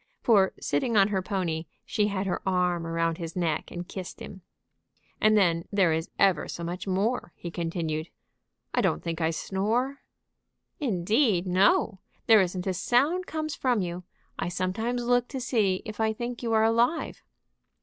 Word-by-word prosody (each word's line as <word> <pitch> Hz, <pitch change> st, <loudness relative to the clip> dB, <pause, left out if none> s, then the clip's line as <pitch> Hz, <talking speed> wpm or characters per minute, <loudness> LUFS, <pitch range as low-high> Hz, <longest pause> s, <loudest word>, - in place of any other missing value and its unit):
For, 200 Hz, -5 st, +4 dB
sitting 210 Hz, +11 st, 0 dB
on 195 Hz, 0 st, +5 dB
her 195 Hz, -2 st, 0 dB
pony, 170 Hz, -4 st, -2 dB, 0.2 s
she 210 Hz, -2 st, +1 dB
had 200 Hz, -1 st, -2 dB
her 190 Hz, -, -2 dB
arm 180 Hz, -3 st, 0 dB
around 165 Hz, 0 st, -1 dB
his 165 Hz, -1 st, -6 dB
neck 165 Hz, -4 st, -1 dB
and 175 Hz, 0 st, -6 dB
kissed 185 Hz, -3 st, -7 dB
him. 190 Hz, -, -9 dB, 0.8 s
"And 215 Hz, 0 st, +5 dB
then 170 Hz, -4 st, +2 dB
there 190 Hz, -5 st, +3 dB
is 160 Hz, +1 st, -2 dB
ever 190 Hz, -6 st, +3 dB
so 170 Hz, -, -6 dB
much 175 Hz, +3 st, -5 dB
more," 195 Hz, +1 st, -1 dB
he 170 Hz, -, -7 dB
continued. 165 Hz, -2 st, -3 dB, 0.6 s
"I -, -, +2 dB
don't 75 Hz, -, 0 dB
think 165 Hz, 0 st, -3 dB
I 160 Hz, -, +2 dB
snore?" 220 Hz, -, -1 dB, 0.8 s
"Indeed, 210 Hz, -, +2 dB
no! 190 Hz, +2 st, +3 dB, 0.3 s
There 220 Hz, -3 st, +7 dB
isn't 180 Hz, 0 st, -2 dB
a 190 Hz, -, 0 dB
sound 285 Hz, -, +1 dB
comes 310 Hz, -1 st, -3 dB
from 250 Hz, -4 st, +1 dB
you. 175 Hz, +1 st, -5 dB, 0.4 s
I -, -, -1 dB
sometimes 220 Hz, +7 st, -2 dB
look 245 Hz, 0 st, +2 dB
to 265 Hz, -, -5 dB
see 215 Hz, -7 st, +1 dB
if 215 Hz, -1 st, -7 dB
I 220 Hz, 0 st, +2 dB
think 240 Hz, +2 st, -5 dB
you 235 Hz, -2 st, -2 dB
are 220 Hz, 0 st, +4 dB
alive." 235 Hz, +8 st, +1 dB
190 Hz, 170 wpm, -27 LUFS, 175-225 Hz, 0.8 s, There